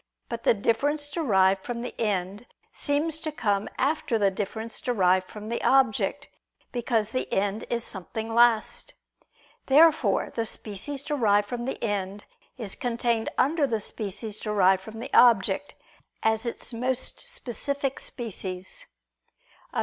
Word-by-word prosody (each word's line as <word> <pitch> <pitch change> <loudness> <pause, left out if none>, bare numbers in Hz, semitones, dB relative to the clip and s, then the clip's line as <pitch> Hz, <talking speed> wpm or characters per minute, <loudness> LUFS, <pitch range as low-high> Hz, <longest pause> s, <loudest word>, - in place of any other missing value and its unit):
But 235 -1 -5
the - - +5
difference 290 +8 0
derived 195 - +2
from 240 -1 -4
the 245 - -5
end 205 +1 -1 0.2
seems 300 +2 -1
to 315 -1 -3
come 205 -8 -1
after 285 -3 +1
the 200 -2 +3
difference 220 +3 -4
derived 185 -6 +2
from 210 0 -9
the 235 - -3
object: 265 -5 +2 0.4
because 230 -3 0
the 255 - -3
end 200 +2 0
is 235 -1 -1
something 220 +4 -5
last. 235 -2 +2 0.7
Therefore 285 -7 +4
the 230 -1 -2
species 230 +8 -3
derived 210 -9 +2
from 240 +1 -4
the 265 - -3
end, 205 -2 -2 0.3
is 215 -6 -3
contained 235 -2 0
under 290 +1 +2
the 225 -3 -1
species 210 +1 -5
derived 195 -3 +3
from 220 +3 -9
the - - -7
object, 235 +2 +4 0.5
as 220 +1 +1
its 235 - -1
most 250 +2 -1
specific 280 - -2
species. 190 -6 -4 0.8
Obj. - - -2
230 Hz, 135 wpm, -26 LUFS, 205-260 Hz, 0.8 s, the